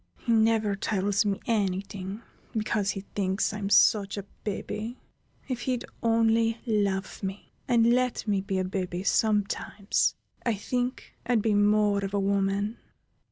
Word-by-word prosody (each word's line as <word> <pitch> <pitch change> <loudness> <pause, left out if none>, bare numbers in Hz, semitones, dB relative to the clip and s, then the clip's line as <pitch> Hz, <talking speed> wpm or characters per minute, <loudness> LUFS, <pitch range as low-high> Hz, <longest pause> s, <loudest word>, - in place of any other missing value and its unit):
He - - -3
never 220 -2 +3
tells 200 +1 0
me 200 -1 0
any 195 -5 +1
thing 195 +2 -7 0.3
because 215 -2 0
he 195 - -2
thinks 195 +1 0
I'm 205 -2 -3
such 205 0 +4
a 200 - -3 0.2
baby. 215 +3 -4 0.5
If 250 -3 -3
he'd 250 -2 -1 0.2
only 230 0 +2
love 200 -4 0
me, 195 0 -6 0.2
and 235 -1 +4
let 250 -2 0
me 200 -2 +1
be 195 0 -2
a 185 - +1
baby 185 -1 -3
sometimes, 205 -1 +1 0.3
I 235 -3 +1
think 245 +5 -3
I'd 235 -4 +2
be 220 - +2
more 205 0 +3
of 195 +1 -3
a - - +2
woman." 200 +2 0
205 Hz, 150 wpm, -27 LUFS, 195-225 Hz, 0.5 s, such